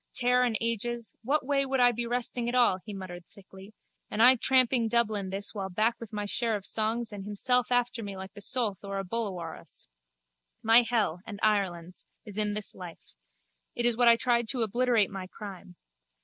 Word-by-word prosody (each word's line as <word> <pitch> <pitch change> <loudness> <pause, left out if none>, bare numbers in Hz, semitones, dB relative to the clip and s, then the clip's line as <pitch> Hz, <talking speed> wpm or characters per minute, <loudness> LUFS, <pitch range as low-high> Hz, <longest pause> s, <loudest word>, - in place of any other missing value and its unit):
Tare 250 0 +3
and 235 -3 +1
ages, 230 -1 -2
what 270 +4 0
way 275 0 +2
would 265 -1 -1
I 245 0 +6
be 240 0 -4
resting 240 0 -1
at 245 - -2
all, 235 -7 +4
he 215 - -8
muttered 185 -3 -8
thickly, 195 0 -15 0.4
and 210 - -4
I 250 +3 +8
tramping 255 -1 +3
Dublin 215 -4 +1
this 195 +1 -2
while 195 -3 -4
back 215 +5 0
with 230 -2 -9
my 210 -1 -3
share 225 +2 0
of 200 -2 -6
songs 225 +1 0
and 200 -1 -6
himself 245 +5 +1
after 245 -1 +1
me 200 -2 -6
the - - -9
like 190 0 -8
of 205 - -26
a - - -8
soulth 220 -4 -1
or 200 0 -4
a 195 - -2
bullawurrus? 185 -5 -5 0.8
My 225 +2 +7
hell, 215 -8 -1
and 205 -3 -7
Ireland's, 185 -5 -1 0.2
is 210 -1 -4
in 210 -1 +1
this 210 -1 -3
life. 175 -3 -11 0.6
It 240 - -1
is 240 -1 +3
what 240 +1 +3
I 235 - +8
tried 235 -1 +1
to 245 0 +2
obliterate 235 -1 +2
my 190 -2 -6
crime. 190 -2 -10
220 Hz, 205 wpm, -28 LUFS, 195-240 Hz, 0.8 s, I